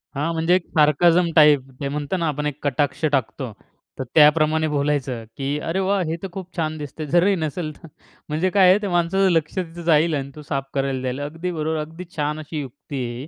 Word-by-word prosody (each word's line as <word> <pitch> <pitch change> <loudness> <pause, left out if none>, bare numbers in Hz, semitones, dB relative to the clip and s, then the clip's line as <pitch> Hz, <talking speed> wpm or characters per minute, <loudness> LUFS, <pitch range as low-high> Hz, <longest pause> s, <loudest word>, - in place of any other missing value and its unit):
हां, 150 +4 -1
म्हणजे 165 +2 +2
एक 185 - -1
सार्कैज़म 165 +4 +4
टाईप. 150 -3 +7 0.2
ते 140 - -1
म्हणतो 145 +5 -2
ना 170 -2 -1
आपण 150 0 -2
एक 145 -1 -4
कटाक्ष 145 +1 -1
टाकतो. 130 -2 -1 0.5
तर - - -1
त्याप्रमाणे 155 +1 +5
बोलायचं 140 -5 -1
की 140 +1 -2
"अरे 180 +3 0
वाह! 195 0 +1
हे 160 - -1
तर - - -2
खूप 185 0 -9
छान 155 -1 -1
दिसतंय." 150 +1 -6
जरी 185 +3 +4
नसेल 160 -1 -3
तर 165 - -14 0.4
म्हणजे 160 +5 0
काय 190 -1 +5
आहे 185 - +6
त्या 205 -2 -3
माणसाचं 175 +2 +2
लक्ष 160 -2 0
तिथं 175 -2 -4
जाईल 160 0 +4
आणि 140 -1 -4
तो 150 - -9
साफ 135 -2 -1
करायला 135 -1 -1
जाईल. 130 +1 -3
अगदी 165 +5 -4
बरोबर, 160 -1 -2
अगदी 160 +4 -6
छान 150 +1 -1
अशी 155 0 -5
युक्ती 135 0 -6
आहे 120 +1 -6
ही. 140 - -8
155 Hz, 215 wpm, -22 LUFS, 145-170 Hz, 0.5 s, टाईप